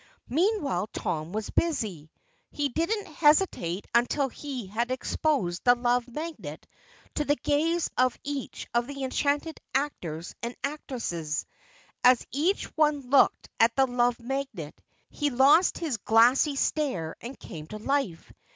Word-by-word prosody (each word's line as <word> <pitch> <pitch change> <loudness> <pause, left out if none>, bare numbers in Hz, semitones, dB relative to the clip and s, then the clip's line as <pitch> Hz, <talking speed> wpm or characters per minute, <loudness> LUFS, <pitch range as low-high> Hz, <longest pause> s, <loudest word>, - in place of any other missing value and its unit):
Meanwhile 290 - +1
Tom 155 +1 -3
was 215 +1 -4
busy. 205 - -1 0.4
He 290 -1 -1
didn't 390 - -1
hesitate 295 - +2
until 255 +4 +2
he 260 -3 -6
had 225 +5 -2
exposed 255 - -1
the 245 0 +6
Love 245 0 +1
Magnet 310 +6 -7 0.5
to 300 - 0
the 290 0 +2
gaze 320 +4 +1
of 255 -1 +3
each 285 -2 -5
of 235 0 +1
the 275 -1 -5
enchanted 285 +4 -1 0.2
actors 175 - -2
and 235 +1 -4
actresses. 230 - -3 0.6
As 250 -1 +6
each 325 - +1
one 295 -4 +1
looked 280 - +4
at 230 +1 +4
the 270 - +4
Love 245 -1 +1
Magnet 245 - -4 0.4
he 295 -1 0
lost 280 +7 +5
his 310 -8 -2
glassy 240 +7 +4
stare 260 - -1
and 250 +3 -7
came 155 -6 -9
to 215 - -7
life. 215 -7 -2
260 Hz, 135 wpm, -27 LUFS, 225-295 Hz, 0.6 s, the